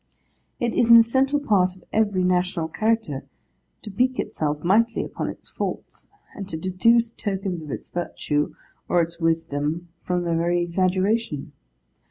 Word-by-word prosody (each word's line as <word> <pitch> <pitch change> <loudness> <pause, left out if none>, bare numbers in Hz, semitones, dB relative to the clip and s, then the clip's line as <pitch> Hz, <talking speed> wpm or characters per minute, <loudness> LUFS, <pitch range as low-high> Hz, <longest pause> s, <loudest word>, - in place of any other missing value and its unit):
It 235 -1 0
is 235 - +2
an 235 - +11
essential 265 +5 +3
part 190 -9 +2
of 185 - -19
every 205 -4 +2
national 180 -2 +1
character 220 -8 0 0.6
to 210 - -7
pique 255 +5 +1
itself 150 -1 -2
mightily 230 +6 +2
upon - - -4
its - - -9
faults, - - -5 0.3
and 195 -2 -7
to 160 - -3
deduce 225 +7 +2
tokens 195 -5 -3
of 155 - -9
its - - -5
virtue 150 -4 -2 0.3
or 175 -1 +4
its 165 +1 -6
wisdom 165 0 -1
from 180 -1 -1
their 170 -1 0
very 170 +1 +1
exaggeration. 185 0 0
185 Hz, 150 wpm, -24 LUFS, 170-225 Hz, 0.6 s, an